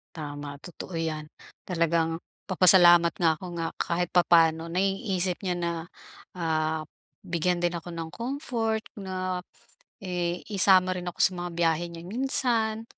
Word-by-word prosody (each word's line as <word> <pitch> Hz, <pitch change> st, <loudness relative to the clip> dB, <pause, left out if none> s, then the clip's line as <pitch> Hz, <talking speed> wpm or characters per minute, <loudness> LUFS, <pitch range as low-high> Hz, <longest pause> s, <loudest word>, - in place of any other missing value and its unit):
Tama, 145 Hz, -2 st, -7 dB
totoo 175 Hz, +2 st, -8 dB
'yan, 155 Hz, -2 st, -3 dB, 0.4 s
talagang 165 Hz, -2 st, +1 dB, 0.3 s
nagpapasalamat 175 Hz, -2 st, +7 dB
nga 160 Hz, -2 st, +3 dB
ako 185 Hz, -, -12 dB, 0.2 s
nga 165 Hz, -, -1 dB
kahit 175 Hz, 0 st, -1 dB
papaano 165 Hz, -2 st, +3 dB
naiisip 190 Hz, -1 st, 0 dB
niya 185 Hz, -, 0 dB
na, 170 Hz, -1 st, -1 dB, 0.6 s
ah, 160 Hz, -2 st, -1 dB, 0.4 s
bigyan 175 Hz, -1 st, -1 dB
din 175 Hz, 0 st, 0 dB
ako 170 Hz, +1 st, -8 dB
ng 165 Hz, -1 st, -5 dB
comfort 235 Hz, -3 st, -2 dB, 0.2 s
na 185 Hz, -2 st, -4 dB, 0.6 s
i 175 Hz, -1 st, -2 dB
isama 185 Hz, -1 st, +5 dB
rin 180 Hz, 0 st, -5 dB
ako 175 Hz, -, -7 dB
sa -, -, +6 dB
mga 175 Hz, 0 st, -4 dB
biyahe 165 Hz, -1 st, +1 dB
niya 165 Hz, 0 st, -9 dB
minsan, 230 Hz, -2 st, 0 dB
175 Hz, 135 wpm, -27 LUFS, 165-190 Hz, 0.6 s, nagpapasalamat